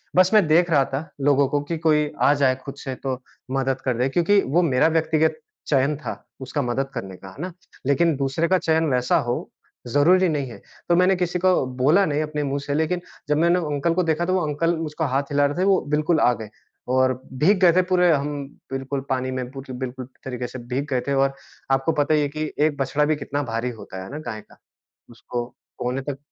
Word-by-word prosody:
बस 185 0 +5
मैं 210 -4 +6
देख 170 +3 +4
रहा 140 -4 +5
था 135 - 0 0.2
लोगों 140 0 +4
को 145 - +1
कि 165 +3 -3
कोई 150 -2 +2
आ 145 - +5
जाए 130 -2 +4
खुद 140 -1 -7
से 130 -2 -4
तो 130 -2 -2 0.3
मदद 135 0 0
कर 125 -3 0
दे 125 +2 +2
क्योंकि 175 +8 +3
वो 155 +7 +2
मेरा 135 -3 +3
व्यक्तिगत 160 -1 +1 0.3
चयन 140 +1 +2
था, 150 - -5 0.3
उसका 145 +3 -2
मदद 135 +2 -1
करने 95 -6 -6
का 95 - -11
है 115 - -11
ना, 185 +1 -4 0.3
लेकिन 160 +4 +3
दूसरे 140 +4 0
का 185 - +3
चयन 160 -2 +1
वैसा 125 0 +2
हो 120 - -2 0.4
ज़रूरी 170 +8 +4
नहीं 145 -4 -2
है। - - -11 0.3
तो 170 - +5
मैंने 185 +2 +4
किसी 180 0 -1
को 185 -5 +3
बोला 155 +10 +4
नहीं 150 -2 0
अपने 150 -1 -3
मुँह 140 0 -1
से 140 - -1
लेकिन 160 +4 0 0.3
जब 150 - +3
मैंने 170 +3 +3 0.2
अंकल 165 +4 +1
को 185 +2 +1
देखा, 165 +1 0
तो 185 - 0
वो 185 - +2
अंकल 165 +3 +1 0.2
उसको 155 +2 -3
हाथ 140 - +2
हिला 145 0 +3
रहे 145 +2 -1
थे - - +3
वो 195 -2 +4
बिल्कुल 155 +2 +2
आ 125 - +4
गए 110 - -7 0.4
और 130 0 +3 0.2
भीग 185 +8 +4
गए 180 -2 +7
थे 185 - +5
पूरे 180 -1 +5
हम 145 -1 -1 0.3
बिल्कुल 135 +1 -3
पानी 130 0 -1
में 130 -1 -4
पूर 135 0 -9
बिल्कुल 130 0 -5 0.2
तरीके 125 -2 -4
से 130 - -8
भीग 140 +3 -1
गए 125 -2 +1
थे 140 - +1
और 135 0 +2 0.4
आपको 135 +4 +2
पता 145 +2 +1
ही 150 - +3
है 145 - +1
कि 155 +1 -4
एक 150 -1 +2
बछड़ा 140 +2 +1
भी 155 +1 +2
कितना 145 0 -3
भारी 115 +2 -1
होता 95 0 -8
है 95 - -10
ना 150 - -5
गाय 110 -2 -5
का - - -21 0.5
उसको 120 +1 -5 0.3
कोने 125 +2 -2
तक 140 0 -5
145 Hz, 230 wpm, -23 LUFS, 130-165 Hz, 0.5 s, गए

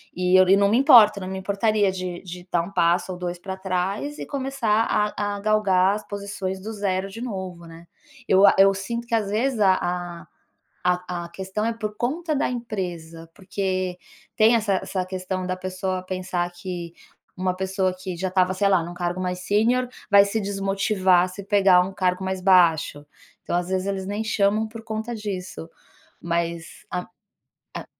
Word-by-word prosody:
E 180 +1 +2
eu 185 0 +6
e 195 - +7
não 200 0 +3
me 225 - +3
importo, 240 -8 +7
não 185 - -6
me 190 0 -4
importaria 200 +1 +1
de 185 -1 -5
de 180 0 -9
dar 170 -1 +2
1 195 - -8
passo 175 0 +2
ou 180 - -6
2 175 0 -4
pra 190 +1 -6
trás 190 +9 -2
e - - -6
começar 260 -6 0
a 205 -1 0
a - - -6
galgar 200 -2 +3
as 210 - -8
posições 200 -2 -5
do 220 +3 -6
0 195 -2 -1
de 230 +4 -9
novo, 185 -7 -6
né. 165 +1 -13 0.4
Eu 195 +2 +6
a - - +5
eu 195 0 +6
sinto 235 +5 -4
que 235 - -8
às 215 -3 +1
vezes 230 +3 0
a 190 -2 +5
a 175 -1 -4 0.6
a 180 -1 -1
a - - -9
questão 190 +4 -4
é 230 - 0
por 215 -2 -5
conta 310 +6 -1
da - - +1
empresa, 175 -9 -5
porque 185 -2 -3 0.4
tem 220 +2 +5
essa 215 -4 +1
essa 185 -2 -3
questão 185 0 -4
da 185 0 -2
pessoa 185 0 -3
pensar 185 -1 -3
que 175 -1 -6 0.4
uma 185 0 -1
pessoa 190 0 0
que 185 -1 -6
já 185 +2 -2
estava, 185 0 +2
sei 200 +1 +2
lá, 190 -4 +3
num 175 +1 -7
cargo 175 +1 -3
mais 180 0 -3
sênior, 230 +6 +1 0.2
vai 200 0 +8
se 210 +2 -2
desmotivar 195 -2 +1
se 185 +2 -8
pegar 195 -2 +5
um 185 +2 -2
cargo 185 -1 0
mais 190 0 -2
baixo, 170 -6 +3 0.4
então - - -2
às 175 0 -1
vezes 190 0 -1
eles 190 -1 -3
nem 205 +2 -2
chamam 215 0 +1
por 225 0 -10
conta 220 +2 -4
disso. 190 -6 -6 0.5
Mas 170 -1 -3
a 180 0 -3 0.7
a - - -6
190 Hz, 190 wpm, -24 LUFS, 180-210 Hz, 0.7 s, vai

